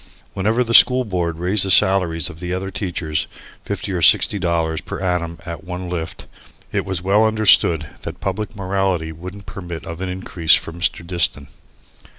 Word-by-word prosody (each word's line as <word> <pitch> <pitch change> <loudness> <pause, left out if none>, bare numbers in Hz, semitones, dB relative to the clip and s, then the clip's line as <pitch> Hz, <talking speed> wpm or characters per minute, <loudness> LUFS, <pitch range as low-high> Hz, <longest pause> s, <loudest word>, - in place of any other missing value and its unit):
Whenever 110 +6 +1
the 115 -1 -3
School 125 +1 +7
Board 85 -5 -2
raised 95 +4 +1
the 95 - -1
salaries 90 -4 +4
of 80 - -9
the 90 0 -3
other 95 +1 -4
teachers, 80 -6 -3 0.4
fifty - - -4
or 90 -2 -2
sixty 100 +5 +5
dollars 85 -3 -1
per - - -7
annum 90 -3 -2
at 85 0 -7
one 90 0 -6
lift, 85 -2 -5 0.5
it - - -1
was 95 -2 -4
well 100 +3 +3
understood 110 -7 +4 0.2
that - - -7
public 105 +3 -4
morality 95 -4 -1
wouldn't 90 +5 -9
permit 85 -5 -7
of 85 +1 -7
an 95 - -3
increase 90 -2 +2
for 80 - -4
Mr. 85 0 -2
Diston. 85 -5 -1
90 Hz, 170 wpm, -20 LUFS, 85-95 Hz, 0.5 s, School